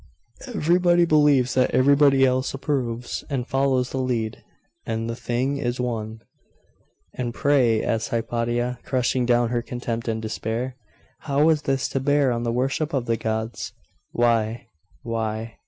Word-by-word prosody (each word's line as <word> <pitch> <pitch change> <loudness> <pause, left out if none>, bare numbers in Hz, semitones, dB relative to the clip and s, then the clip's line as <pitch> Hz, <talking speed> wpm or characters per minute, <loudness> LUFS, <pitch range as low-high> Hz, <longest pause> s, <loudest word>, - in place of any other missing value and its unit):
Everybody 175 +1 +3
believes 145 -5 +4
that 130 -1 +3
everybody 140 0 +5
else 130 +1 0
approves, 125 -4 -3
and 130 -4 -2
follows 135 -2 +1
the 135 - -2
lead.... 120 -4 -2 0.4
And 115 0 -3
the 115 - -3
thing 125 +4 -1
is 125 -2 -2
won.' 110 -3 -3 0.9
'And 120 -2 -4
pray,' 125 -6 +3
asked 115 0 -1
Hypatia, 120 +1 -1
crushing 125 -1 0
down 120 -1 +3
her 120 0 0
contempt 120 -1 -4
and 110 -1 -1
despair, 115 +3 -3 0.4
'how 145 +2 +2
is 155 -2 +2
this 135 -3 0
to 135 - -1
bear 140 0 +2
on 115 -1 -1
the 120 -1 -1
worship 135 +5 -1
of 130 -3 -1
the 115 -1 +1
gods? 110 +1 -3 0.4
'Why.... 115 -1 +1 0.4
why 115 -1 -3
125 Hz, 145 wpm, -24 LUFS, 115-135 Hz, 0.9 s, everybody